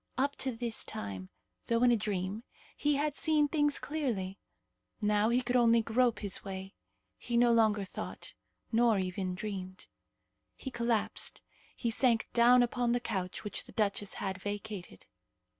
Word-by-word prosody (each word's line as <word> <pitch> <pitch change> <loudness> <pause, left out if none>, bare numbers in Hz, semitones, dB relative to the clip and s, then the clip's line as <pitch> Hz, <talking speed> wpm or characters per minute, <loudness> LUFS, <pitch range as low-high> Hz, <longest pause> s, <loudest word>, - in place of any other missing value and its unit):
Up 280 +2 +1
to 265 - 0
this 230 -1 -2
time, 95 -2 -6 0.4
though 230 +1 +2
in 245 - +6
a - - +5
dream, 205 0 -2 0.3
he 295 0 +1
had 290 0 0
seen 305 -1 +3
things 295 -1 +1
clearly. 230 -11 -3 0.6
Now 210 +1 +2
he 245 +2 +2
could 245 +1 -1
only 230 -2 +5
grope 235 +1 +2
his 200 -3 -1
way. 190 0 -6 0.5
He 240 -1 -1
no 240 0 +5
longer 215 -3 +3
thought, - - -7 0.4
nor 230 -2 +4
even 185 0 -2
dreamed. 185 -1 -6 0.7
He 265 - -7
collapsed. 235 -2 -1 0.3
He 235 - -1
sank 230 -1 +2
down 245 +1 +6
upon 245 0 0
the 245 - +2
couch 190 -6 -3
which 210 - -3
the - - -13
duchess 205 -2 0
had 190 -1 -3
vacated. 205 - -6
225 Hz, 155 wpm, -32 LUFS, 200-245 Hz, 0.7 s, in